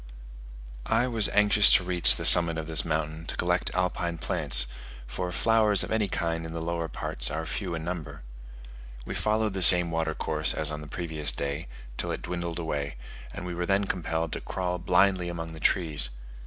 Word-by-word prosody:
I 125 Hz, -, 0 dB
was 115 Hz, -5 st, +3 dB
anxious 105 Hz, 0 st, +5 dB
to -, -, +3 dB
reach 85 Hz, -9 st, +4 dB
the -, -, -5 dB
summit 85 Hz, -1 st, +8 dB
of 80 Hz, -, -5 dB
this 80 Hz, -2 st, +1 dB
mountain 80 Hz, 0 st, -5 dB
to -, -, -5 dB
collect 90 Hz, 0 st, -1 dB
alpine 90 Hz, -2 st, -3 dB
plants; 80 Hz, -, +4 dB, 0.4 s
for 90 Hz, +9 st, -6 dB
flowers 110 Hz, 0 st, +2 dB
of -, -, -8 dB
any 110 Hz, -2 st, -1 dB
kind 85 Hz, -2 st, -4 dB
in 80 Hz, 0 st, -9 dB
the 85 Hz, -, -5 dB
lower 85 Hz, 0 st, -4 dB
parts 60 Hz, -4 st, -2 dB
are 80 Hz, +3 st, -5 dB
few 90 Hz, 0 st, -5 dB
in 80 Hz, -, -7 dB
number. 85 Hz, -6 st, -8 dB, 0.8 s
We -, -, -7 dB
followed 110 Hz, -1 st, -2 dB
the 95 Hz, -, -4 dB
same 90 Hz, -1 st, +8 dB
water 80 Hz, -1 st, -3 dB
course 80 Hz, 0 st, -3 dB
as 80 Hz, -1 st, -1 dB
on 75 Hz, 0 st, -7 dB
the 75 Hz, -, -11 dB
previous 80 Hz, -1 st, -2 dB
day, 70 Hz, +4 st, -6 dB, 0.3 s
till -, -, -4 dB
it -, -, -6 dB
dwindled 85 Hz, -1 st, -6 dB
away, 75 Hz, -5 st, -5 dB, 0.4 s
and 90 Hz, -, -9 dB
we 90 Hz, -, -6 dB
were 85 Hz, 0 st, -5 dB
then 100 Hz, +1 st, 0 dB
compelled 85 Hz, -4 st, -4 dB
to -, -, -5 dB
crawl 90 Hz, -1 st, -5 dB
blindly 90 Hz, 0 st, 0 dB
among 85 Hz, -1 st, -7 dB
the 80 Hz, -, -11 dB
trees. 75 Hz, -6 st, 0 dB
85 Hz, 195 wpm, -25 LUFS, 80-90 Hz, 0.8 s, summit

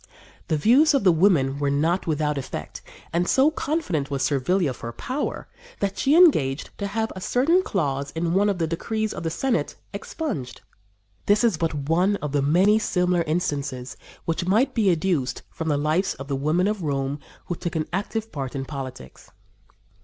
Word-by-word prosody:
The 155 Hz, -, +1 dB
views 280 Hz, -, +5 dB
of 275 Hz, -, +2 dB
the 185 Hz, -, +6 dB
women 155 Hz, -6 st, +3 dB
were 145 Hz, -1 st, +1 dB
not 160 Hz, +7 st, +1 dB
without 150 Hz, -1 st, 0 dB
effect, 135 Hz, -, -7 dB, 0.3 s
and 175 Hz, +1 st, +1 dB
so 275 Hz, +4 st, +4 dB
confident 285 Hz, -, -2 dB
was 140 Hz, -2 st, -1 dB
Servilia 145 Hz, +4 st, +1 dB
of 125 Hz, -, -10 dB
her 115 Hz, -, -5 dB
power 260 Hz, -, -4 dB, 0.3 s
that 200 Hz, -1 st, -1 dB
she 270 Hz, +10 st, +2 dB
engaged 155 Hz, -, +4 dB
to 200 Hz, -, -2 dB
have 220 Hz, +2 st, -2 dB
a 185 Hz, -, -7 dB
certain 305 Hz, -, +3 dB
clause 140 Hz, -, -2 dB
in 165 Hz, +1 st, -1 dB
one 200 Hz, +2 st, +3 dB
of 200 Hz, -, 0 dB
the 165 Hz, -, 0 dB
decrees 215 Hz, +7 st, -2 dB
of -, -, -6 dB
the 165 Hz, -, -1 dB
Senate 240 Hz, +9 st, -1 dB, 0.2 s
expunged. 310 Hz, -, -5 dB, 0.7 s
This 205 Hz, +3 st, +4 dB
is 230 Hz, -6 st, +3 dB
but 155 Hz, -3 st, -2 dB
one 180 Hz, +5 st, +3 dB
of 150 Hz, -7 st, -5 dB
many 185 Hz, +9 st, +4 dB
similar 180 Hz, -4 st, +1 dB
instances 140 Hz, -6 st, -2 dB, 0.3 s
which 170 Hz, +2 st, -2 dB
might 220 Hz, +8 st, +3 dB
be 215 Hz, -5 st, +2 dB
adduced 165 Hz, -6 st, 0 dB
from 160 Hz, -, -5 dB
the 150 Hz, -2 st, +2 dB
lives 155 Hz, +6 st, 0 dB
of 135 Hz, +1 st, -8 dB
the 140 Hz, -, -1 dB
women 155 Hz, +7 st, +1 dB
of 210 Hz, -2 st, -1 dB
Rome 140 Hz, -2 st, -2 dB, 0.3 s
who -, -, -3 dB
took 170 Hz, 0 st, -5 dB
an 155 Hz, -1 st, 0 dB
active 220 Hz, +3 st, -3 dB
part 135 Hz, -2 st, -5 dB
in 135 Hz, -1 st, -3 dB
politics. 130 Hz, -, -8 dB
170 Hz, 185 wpm, -24 LUFS, 145-205 Hz, 0.7 s, the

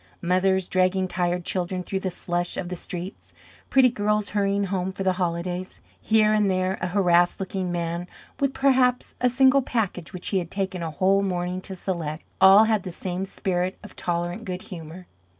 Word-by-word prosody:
Mothers 185 Hz, +1 st, +2 dB
dragging 185 Hz, 0 st, +2 dB
tired 175 Hz, -1 st, -1 dB
children 180 Hz, 0 st, -2 dB
through 190 Hz, +1 st, -3 dB
the 190 Hz, -, -2 dB
slush 175 Hz, 0 st, -3 dB
of 175 Hz, -, -3 dB
the 180 Hz, -, -3 dB
streets; 180 Hz, +1 st, -7 dB, 0.3 s
pretty 265 Hz, -2 st, +5 dB
girls 210 Hz, -2 st, 0 dB
hurrying 200 Hz, 0 st, +1 dB
home 190 Hz, -1 st, -1 dB
for 195 Hz, -, -5 dB
the 190 Hz, -1 st, +2 dB
holidays; 175 Hz, +1 st, -3 dB, 0.2 s
here 215 Hz, -1 st, +3 dB
and 210 Hz, -2 st, +3 dB
there 185 Hz, 0 st, 0 dB
a 180 Hz, -, 0 dB
harassed 175 Hz, -2 st, +3 dB
looking 190 Hz, -1 st, -3 dB
man 170 Hz, 0 st, -3 dB, 0.3 s
with 275 Hz, -2 st, +1 dB
perhaps 260 Hz, -2 st, +2 dB
a 250 Hz, -, +4 dB
single 265 Hz, +2 st, +5 dB
package 210 Hz, -9 st, -2 dB
which 180 Hz, -, -6 dB
he 195 Hz, -, +1 dB
had 170 Hz, -2 st, -5 dB
taken 190 Hz, -2 st, -3 dB
a 165 Hz, -, -2 dB
whole 190 Hz, +5 st, +2 dB
morning 180 Hz, -1 st, -2 dB
to 190 Hz, -, -6 dB
select 170 Hz, -4 st, -4 dB, 0.2 s
all 195 Hz, +3 st, +9 dB
had 220 Hz, -2 st, +2 dB
the 180 Hz, -, -6 dB
same 180 Hz, +2 st, -4 dB
spirit 185 Hz, -1 st, -2 dB
of -, -, -12 dB
tolerant 175 Hz, +4 st, -2 dB
good 185 Hz, -3 st, -5 dB
humor. 175 Hz, -1 st, -9 dB
185 Hz, 185 wpm, -25 LUFS, 175-200 Hz, 0.3 s, all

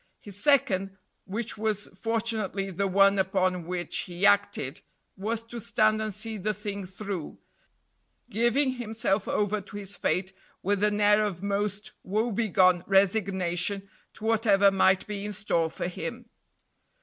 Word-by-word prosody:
His 205 Hz, -1 st, -7 dB
second, 195 Hz, -9 st, +2 dB, 0.3 s
which 215 Hz, +2 st, -3 dB
was 215 Hz, -1 st, 0 dB
fortunately 220 Hz, -2 st, -2 dB
the 195 Hz, +2 st, -1 dB
one 195 Hz, +1 st, +4 dB
upon 185 Hz, -2 st, 0 dB
which 180 Hz, -1 st, -3 dB
he 180 Hz, +2 st, -1 dB
acted, 205 Hz, 0 st, +2 dB, 0.3 s
was 220 Hz, +3 st, -3 dB
to 235 Hz, +1 st, -7 dB
stand 215 Hz, 0 st, +2 dB
and 215 Hz, 0 st, -2 dB
see 215 Hz, +2 st, -2 dB
the 210 Hz, +2 st, -2 dB
thing 200 Hz, -2 st, -5 dB
through, 190 Hz, -3 st, -6 dB, 0.9 s
giving 245 Hz, +4 st, +1 dB
himself 220 Hz, -3 st, -1 dB
over 210 Hz, 0 st, 0 dB
to 205 Hz, +1 st, -10 dB
his 200 Hz, -1 st, -4 dB
fate 185 Hz, +1 st, -1 dB, 0.3 s
with 205 Hz, +1 st, 0 dB
an 210 Hz, 0 st, +2 dB
air 210 Hz, 0 st, +5 dB
of 195 Hz, -3 st, -3 dB
most 205 Hz, 0 st, -2 dB
woebegone 200 Hz, -4 st, +2 dB
resignation 195 Hz, -1 st, +1 dB, 0.3 s
to -, -, -14 dB
whatever 205 Hz, -3 st, +4 dB
might 190 Hz, -1 st, +3 dB
be 205 Hz, -2 st, -5 dB
in 210 Hz, 0 st, -4 dB
store 170 Hz, -5 st, 0 dB
for 175 Hz, -, -4 dB
him. 240 Hz, +7 st, -6 dB
200 Hz, 140 wpm, -27 LUFS, 190-215 Hz, 0.9 s, air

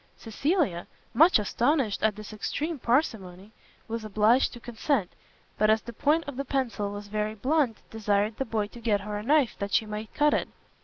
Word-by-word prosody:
Cecilia, 250 Hz, -, -1 dB, 0.3 s
much 325 Hz, +9 st, +6 dB
astonished 235 Hz, +2 st, 0 dB
at 215 Hz, -1 st, +2 dB
this 215 Hz, +1 st, -9 dB
extreme 300 Hz, -, -3 dB
parsimony, 215 Hz, -, -1 dB, 0.4 s
was 230 Hz, 0 st, -4 dB
obliged 215 Hz, +4 st, +3 dB
to 240 Hz, -, -9 dB
consent, 235 Hz, -3 st, -1 dB, 0.5 s
but 215 Hz, -, +4 dB
as 220 Hz, 0 st, +3 dB
the 235 Hz, -, -8 dB
point 305 Hz, +8 st, +2 dB
of 285 Hz, -3 st, -6 dB
the 275 Hz, -, -1 dB
pencil 245 Hz, -7 st, -2 dB
was 205 Hz, 0 st, -7 dB
very 215 Hz, +1 st, -2 dB
blunt, 260 Hz, 0 st, +1 dB
desired 210 Hz, 0 st, 0 dB
the 270 Hz, -, -1 dB
boy 220 Hz, -3 st, -1 dB
to 240 Hz, -, -12 dB
get 210 Hz, -3 st, +1 dB
her 210 Hz, +1 st, -5 dB
a -, -, -4 dB
knife 275 Hz, +1 st, +2 dB
that 200 Hz, 0 st, -4 dB
she 220 Hz, -, +3 dB
might 210 Hz, 0 st, -6 dB
cut 295 Hz, 0 st, +3 dB
it. -, -, 0 dB
220 Hz, 190 wpm, -27 LUFS, 210-270 Hz, 0.5 s, much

